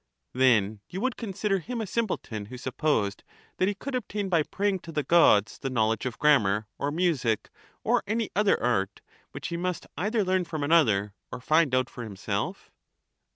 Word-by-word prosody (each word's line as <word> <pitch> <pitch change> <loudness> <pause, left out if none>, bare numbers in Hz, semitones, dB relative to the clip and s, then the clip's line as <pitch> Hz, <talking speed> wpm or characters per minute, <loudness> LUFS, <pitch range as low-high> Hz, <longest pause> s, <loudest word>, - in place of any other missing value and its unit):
Then 110 -5 +3
you 185 - -5
would 255 0 0
consider 200 -2 -1
him 235 +7 -5
a 220 - -2
simpleton 180 - -3
who 125 +3 -8
supposed 125 -5 -1 0.3
that 185 - +2
he 205 - 0
could 275 +7 -6
obtain 210 -5 -2
by 170 -3 +3
praying 195 +4 -1
to 170 - -10
the 150 -2 -1
Gods 125 - +4
the 135 - -3
knowledge 110 -1 +1
of 125 - -5
grammar 110 -8 +3
or 140 - 0
music 145 - 0 0.3
or - - +2
any 225 +1 -1
other 205 0 +3
art, 100 -5 0 0.3
which - - -6
he 170 - -3
must 180 0 -3
either 210 +4 +1
learn 185 -1 +1
from 160 -3 -4
another 110 -11 +3 0.2
or - - -5
find 155 0 +3
out 130 -1 +2
for 120 - -8
himself? 100 -4 -4
155 Hz, 180 wpm, -27 LUFS, 115-190 Hz, 0.3 s, Gods